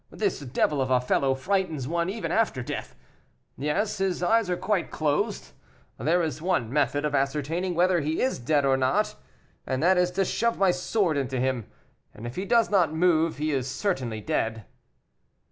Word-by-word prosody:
This 205 -3 -1
devil 140 +1 0
of 130 - -1
a 130 -1 +4
fellow 135 +2 +1
frightens 160 -3 -1
one 170 +3 -1
even 220 +3 -3
after 215 - +1
death. - - -6 0.6
Yes, 150 - -1
his 185 -2 -1
eyes 225 +1 +2
are 180 - 0
quite 205 -3 -1
closed; 145 - -1 0.5
there 165 +9 +2
is 155 -2 -3
one 160 -10 0
method 145 0 +1
of 150 - -1
ascertaining 150 +6 -1
whether 175 0 +3
he 155 +2 -1
is 260 - 0
dead 145 +3 +1
or 135 -1 +3
not, 185 +12 +1 0.5
and 130 +2 -2
that 185 +1 +4
is 180 0 +3
to 195 - +3
shove 235 +5 0
my 195 -2 +4
sword 180 -2 0
into 130 -2 -2
him, 130 -3 -1 0.5
and 110 - -9
if 120 - -6
he 190 - -3
does 230 +1 +3
not 180 -6 +3
move, 165 -1 +2
he 155 +1 -1
is 135 -2 -1
certainly 130 - -2
dead." 110 0 -2
155 Hz, 180 wpm, -26 LUFS, 130-185 Hz, 0.6 s, a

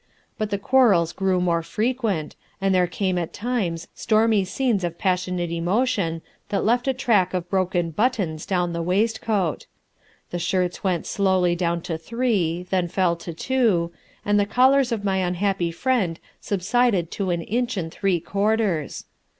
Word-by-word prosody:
But 215 -1 -1
the 200 - -1
quarrels 200 -7 +3
grew 190 -1 +1
more 170 -2 +1
frequent 215 -4 -2 0.2
and 195 -1 +1
there 180 -1 +3
came 185 +1 -1
at 170 - -4
times 200 -8 -2
stormy 220 -2 +2
scenes 205 +1 0
of 170 -1 -3
passionate 180 -2 -1
emotion 175 -1 0 0.3
that 200 - 0
left 245 +4 +2
a 265 - +3
track 210 -8 +2
of 175 -1 -4
broken 180 -3 0
buttons 190 -6 -1
down 175 -2 0
the 170 - -2
waistcoat. 205 0 0 0.6
The 175 - -2
shirts 180 +1 -1
went 180 -4 0
slowly 185 -3 +2
down 170 -1 -1
to 165 -1 -4
three, 185 -4 0
then 185 -2 +1
fell 180 -1 +1
to 170 - -7
two, 190 -3 +1 0.3
and 205 0 +3
the 200 - +1
collars 260 +3 +4
of 220 -3 -2
my 195 -1 +1
unhappy 185 0 0
friend 190 -2 0 0.2
subsided 200 -2 +1
to 195 -2 -2
an 170 -1 -1
inch 240 +3 -1
and 165 -3 -3
three 190 -2 0
quarters. 200 -3 -1
190 Hz, 160 wpm, -23 LUFS, 175-220 Hz, 0.6 s, collars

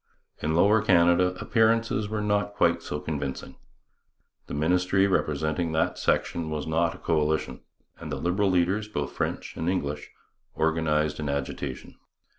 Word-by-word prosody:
In 80 +1 0
Lower 105 +5 +4
Canada 90 -2 +4
appearances 115 -2 +1
were 110 -1 -2
not 105 0 0
quite 85 -3 +2
so 75 - -4
convincing. 70 -3 -5 0.9
The - - -5
ministry 90 +5 +2
representing 80 -2 0
that 80 - 0
section 80 -2 0
was 75 -1 -3
not 85 +1 0
a - - -11
coalition, 80 -1 -1 0.4
and - - -7
the - - -1
Liberal 95 +4 0
leaders, 95 +4 +1
both 75 -9 -3
French - - -3
and 80 - -2
English, 75 -5 -2 0.5
organized 75 -2 +1
an 75 -2 -3
agitation. 70 -1 -4
85 Hz, 140 wpm, -26 LUFS, 75-95 Hz, 0.9 s, Lower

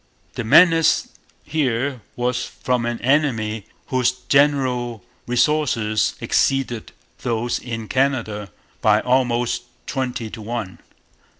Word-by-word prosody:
The 120 - -4
menace 165 +7 +5 0.3
here 135 -3 -1
was 125 0 -1
from 125 -2 -1
an 120 0 -2
enemy 115 -7 +1 0.2
whose 130 -1 +2
general 125 -4 +1 0.2
resources 120 -5 +1
exceeded 130 -4 0 0.3
those 120 0 -1
in 115 -3 -6
Canada 115 -7 0 0.3
by - - +4
almost 125 -1 +1 0.2
twenty 125 -5 -3
to 110 - -8
one. 110 -3 -5
125 Hz, 100 wpm, -21 LUFS, 115-135 Hz, 0.3 s, menace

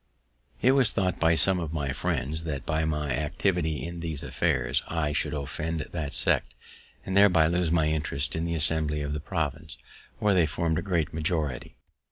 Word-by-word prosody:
It 130 - +6
was 135 -3 +4
thought 90 -2 -1
by 80 0 +3
some 95 +2 +3
of 80 -2 -4
my 70 -4 -2
friends 80 +5 -2
that, 70 -5 -4
by 80 +1 0
my 75 -2 -2
activity 80 +2 -1
in 85 0 -6
these 80 -4 -4
affairs, - - 0
I 80 -3 -1
should 75 - -1
offend 80 +3 -3
that 75 -4 -4
sect, - - +2 0.5
and 95 - -3
thereby 95 -5 +6
lose 85 +1 +1
my 80 -1 +2
interest 75 -3 -1
in 80 - -2
the 85 0 -2
Assembly 75 -1 +4
of 75 0 -3
the 75 - -3
province, 75 -4 -4 0.4
where 105 -1 +2
they 85 -4 +3
formed 80 +1 -1
a - - -3
great 85 -6 -1
majority. 80 -5 -2
80 Hz, 185 wpm, -27 LUFS, 75-85 Hz, 0.5 s, It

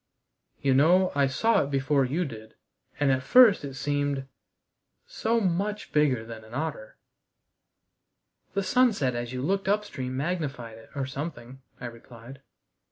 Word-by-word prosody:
"You 135 -1 +2
know, 175 +7 +4
I 140 -1 +3
saw 225 - +2
it 140 - -5
before 135 0 +1
you 160 +8 -1
did, 110 -5 -10 0.4
and 145 -2 +3
at 130 0 +1
first 230 - +6
it 135 -2 -6
seemed 145 -1 -1 0.8
so 230 +1 0
much 205 +2 -2
bigger 135 -7 +2
than 115 -1 -9
an 110 +2 -11
otter." 150 -7 -4 1.6
"The 200 - +1
sunset 200 - +2
as 120 0 -4
you 130 0 -4
looked 195 +5 0
upstream 140 -12 -1
magnified 140 -8 -3
it, 110 - -17
or 140 -2 -1
something," 135 -2 -7 0.2
I - - -7
replied. 120 +2 -11
140 Hz, 145 wpm, -27 LUFS, 130-180 Hz, 1.6 s, first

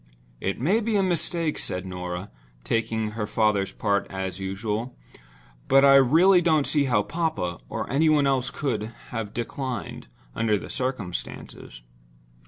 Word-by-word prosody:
"It 95 - -2
may 180 - +2
be 225 -1 -1
a 200 - +3
mistake," 170 -3 0
said 90 +1 -3
Norah, 90 +1 -5 0.3
taking 110 - -1
her 105 -1 -3
father's 105 -3 +1
part, 100 -2 0
as 95 -1 -4
usual. 105 +5 -3 0.7
"But 135 +1 +6
I 140 - +7
really 165 +8 +6
don't 155 -4 +3
see 145 -2 +2
how 120 -6 +2
papa, 155 - -2
or - - -3
any 155 +5 +2
one 150 -2 +4
else, 135 -1 +1
could 110 -8 -2 0.2
have 115 -3 -4
declined, 120 - -5 0.3
under 110 -2 +1
the - - -8
circumstances." 105 - -5
120 Hz, 145 wpm, -25 LUFS, 100-150 Hz, 0.7 s, I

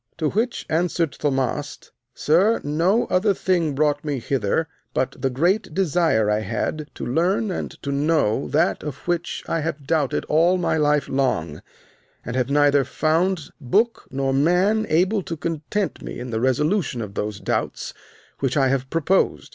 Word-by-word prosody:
To 155 -2 0
which 230 +5 -1
answered 165 -1 0
Thaumast, 140 0 -2 0.2
Sir, 190 +9 +3
no 170 +10 +2
other 195 +2 +2
thing 170 -7 0
brought 145 0 +1
me 145 -3 -2
hither 130 +4 -1 0.3
but 130 +1 0
the 135 - 0
great 175 - 0
desire 165 - +2
I 105 0 +2
had 115 +8 -3
to - - -5
learn 180 - +1
and - - -3
to 140 - -2
know 140 -4 +1
that 150 - +1
of 145 0 -7
which 175 -1 -2
I 165 - 0
have 155 -2 -4
doubted 150 -3 0
all 170 +4 +3
my 175 - 0
life 150 -2 +2
long, 85 - -1 0.6
and 120 - -4
have 130 0 0
neither 145 -1 +4
found 165 +3 0
book 210 - +1
nor 135 0 -1
man 180 +10 +2
able 185 +6 +2
to 165 -2 -5
content 165 +6 -3
me - - -7
in 125 0 -6
the 110 0 -1
resolution 145 - +1
of 100 -2 -8
those 105 -1 -3
doubts - - -2 0.5
which 135 +1 0
I 135 -2 +3
have 130 0 -1
proposed. 165 +4 +1
150 Hz, 165 wpm, -22 LUFS, 135-175 Hz, 0.6 s, neither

